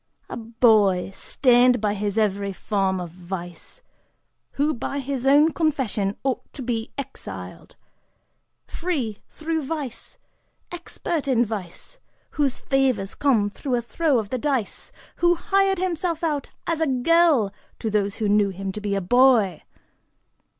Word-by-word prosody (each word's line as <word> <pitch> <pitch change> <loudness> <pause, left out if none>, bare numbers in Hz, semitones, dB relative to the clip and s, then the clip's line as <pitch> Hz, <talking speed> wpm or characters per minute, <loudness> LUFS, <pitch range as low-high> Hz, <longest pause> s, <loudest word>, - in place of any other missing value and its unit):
A - - -3
boy 220 -5 +3
stained 250 +2 +3
by 210 -1 0
every 205 -1 -1
form 195 -1 -1
of 175 -2 -6
vice, 175 - -8 0.7
who, 295 +2 +1
by 275 +2 -4
his 270 -1 -3
own 295 +4 +6
confession, 255 - -1
ought 265 -2 -2
to 270 - -7
be 230 -2 -3
exiled: 275 -1 -8 0.9
free, 275 - -3
through 320 0 -3
vice, 285 -4 -5 0.5
expert 340 -3 -4
in 245 -3 +3
vice, 210 - -7 0.3
whose 280 -4 0
favors 260 -8 0
came 225 -8 +2
through 260 +3 -2
a 240 - 0
throw 295 +3 +1
of 215 -3 -2
the 255 - -2
dice, 265 -5 -2 0.3
who 345 0 +4
hired 390 +1 +1
himself 350 -2 -2
out 300 -4 -1 0.2
as 330 -1 -1
a 320 - +2
girl 270 - +3 0.2
to 220 - -3
those 200 -1 0
who 220 - -1
knew 205 0 +3
him 195 0 -5
to 210 - -7
be 205 -1 -1
a 195 - 0
boy! 230 - +4
245 Hz, 140 wpm, -23 LUFS, 205-295 Hz, 0.9 s, own